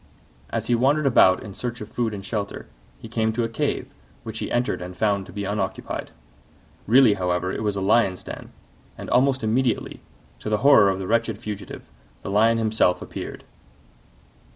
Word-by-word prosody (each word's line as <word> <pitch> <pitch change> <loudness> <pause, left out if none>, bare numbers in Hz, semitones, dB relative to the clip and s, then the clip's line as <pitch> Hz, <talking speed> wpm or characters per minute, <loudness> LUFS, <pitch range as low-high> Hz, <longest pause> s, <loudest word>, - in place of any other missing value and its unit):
As - - -2
he 120 - +1
wandered 140 +6 +2
about 95 -8 +5
in 100 - -8
search 120 +3 -5
of 105 - -7
food 115 0 -2
and 100 -2 -7
shelter, 100 -2 -4 0.3
he - - -10
came 110 -1 0
to 120 +1 0
a - - 0
cave, 115 - -2 0.3
which 110 -1 -6
he - - -4
entered 120 -6 0
and 90 0 -8
found 100 -3 0
to - - -11
be 100 -1 -4
unoccupied. 100 0 -3 0.8
Really, 120 0 +6
however, 90 -1 -1
it - - -4
was 105 -2 -1
a 100 - -2
Lion's 95 -2 +2
den, - - -9 0.5
and - - -7
almost 130 0 +3
immediately, 120 +3 0 0.4
to - - -5
the 105 - +2
horror 125 -9 +7
of 95 - 0
the 95 - -5
wretched 115 +1 0
fugitive, 105 -3 -8 0.3
the - - -4
Lion 110 +3 +4
himself 110 -5 +2
appeared. - - -7
110 Hz, 180 wpm, -24 LUFS, 100-120 Hz, 0.8 s, horror